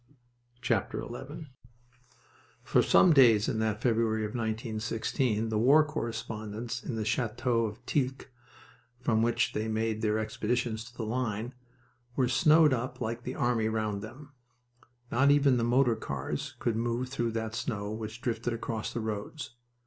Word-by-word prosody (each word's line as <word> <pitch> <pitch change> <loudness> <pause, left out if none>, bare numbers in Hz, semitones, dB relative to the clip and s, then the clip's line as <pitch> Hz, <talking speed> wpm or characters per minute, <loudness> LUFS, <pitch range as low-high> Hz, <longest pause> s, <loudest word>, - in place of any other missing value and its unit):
XI - - +3 1.8
For - - +3
some 175 - +6
days 115 -7 +6
in 110 - -1
that 110 0 -1
February 110 -2 +1
of 105 - -4
1916 110 +1 -1
the 110 -1 0
war 145 +7 +6
correspondents 115 -4 -4
in 120 - -4
the 110 -1 -2
Chateau 120 0 0
of 110 +4 -10
Tilques, 135 -1 -1 0.7
from 115 -3 +1
which 120 +1 +1
they 110 +1 -2
made 110 0 -1
their 110 -1 +1
expeditions 110 +1 -1
to 120 +1 -15
the 115 - -3
line, 115 0 -2 0.6
were 130 - +2
snowed 155 +3 +5
up 120 0 -3
like 115 0 -3
the 125 +2 -5
army 115 -3 +1
round 110 -2 -1
them. 135 +7 -10 0.8
Not 135 +4 +4
even 140 -3 +5
the 115 - 0
motor 120 0 +3
cars 110 - -4
could 115 - -1
move 120 +2 -1
through 120 -4 -2
that 110 -1 -3
snow 110 -3 -3
which 110 +2 -6
drifted 120 0 -2
across 115 -1 -4
the 115 - -3
roads. 110 +7 -5
115 Hz, 150 wpm, -30 LUFS, 110-125 Hz, 1.8 s, some